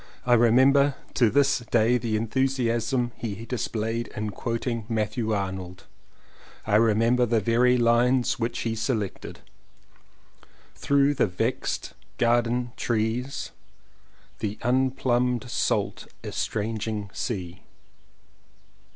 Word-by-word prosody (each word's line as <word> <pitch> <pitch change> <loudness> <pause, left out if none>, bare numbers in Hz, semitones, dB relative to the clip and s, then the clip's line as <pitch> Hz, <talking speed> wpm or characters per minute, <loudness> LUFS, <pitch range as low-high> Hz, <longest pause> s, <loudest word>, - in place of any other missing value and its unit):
I 125 - +4
remember 130 +4 +5 0.2
to 120 -5 +3
this 140 +3 +3
day 120 0 +2
the 110 -2 -1
enthusiasm 120 0 0
he 110 -1 -5
displayed 115 -1 -2
in 105 0 -3
quoting 115 +2 -3
Matthew 110 0 -1
Arnold 95 -3 -4 0.4
— - - -25
I 105 - -2
remember 115 +2 +3
the 115 0 +2
very 120 +4 +3
lines 120 +2 +2
which 115 +1 -2
he 115 - -1
selected: 110 -3 -3 1.3
"Through 140 0 +2
the 130 - +2
vex'd 90 -1 -2 0.2
garden 120 +1 +1
trees." 120 +4 -2 0.9
"The 105 0 -3
unplumbed 125 0 +1
salt - - -1 0.2
estranging 110 -1 -3
sea." 90 -6 -4
115 Hz, 100 wpm, -25 LUFS, 110-125 Hz, 1.3 s, remember